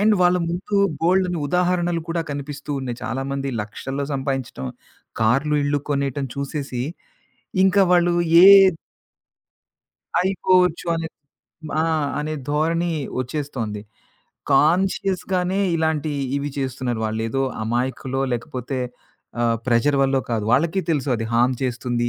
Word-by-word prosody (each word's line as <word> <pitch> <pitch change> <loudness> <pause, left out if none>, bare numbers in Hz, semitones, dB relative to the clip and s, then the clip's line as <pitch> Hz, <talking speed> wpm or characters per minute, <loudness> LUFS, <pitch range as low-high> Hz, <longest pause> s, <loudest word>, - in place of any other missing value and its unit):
And 215 +1 +4
వాళ్ళ 180 0 +4
ముందు 185 +4 -2 0.2
బోలెడన్ని 180 +1 +2
ఉదాహరణలు 175 -1 +1
కూడా 165 0 -1
కనిపిస్తూ 145 +1 -6
ఉన్నాయి. 125 -3 -4
చాలామంది 135 +1 -3
లక్షల్లో 135 +6 -5
సంపాదించటం 135 - -3 0.5
కార్లు 135 +7 +2
ఇళ్లు 145 0 +1
కొనేయటం 140 -1 -1
చూసేసి 140 -3 -4 0.8
ఇంకా 195 +1 +4
వాళ్ళు 175 0 +4 0.3
ఏ - - +10 1.8
అయిపోవచ్చు 185 -2 +2
అనే 165 0 -3 0.7
ఆ! - - +1 0.4
అనే 155 +1 -3 0.2
ధోరణి 165 +3 +1 0.3
ఒచ్చేస్తోంది. 125 -6 -4 0.7
కాన్‌షియస్‌గానే 185 +4 +1 0.2
ఇలాంటియి 155 -2 -1 0.2
ఇవి 140 +1 -2
చేస్తున్నారు 130 -3 -2
వాళ్ళు. 110 +1 -3
ఏదో 135 +2 0 0.2
అమాయకులో 130 +3 -2
లేకపోతే 125 +2 -4 0.6
ఆహ్, 115 -1 +2
ప్రెజర్ 125 +4 +3
వల్లో 135 0 +3
కాదు. 110 -2 -1
వాళ్ళకి 165 +8 +2
తెలుసు 145 -3 0
అది 115 - -3
హార్మ్ 125 +2 +3
చేస్తుంది. 120 -1 -1
140 Hz, 110 wpm, -22 LUFS, 130-170 Hz, 1.8 s, ఏ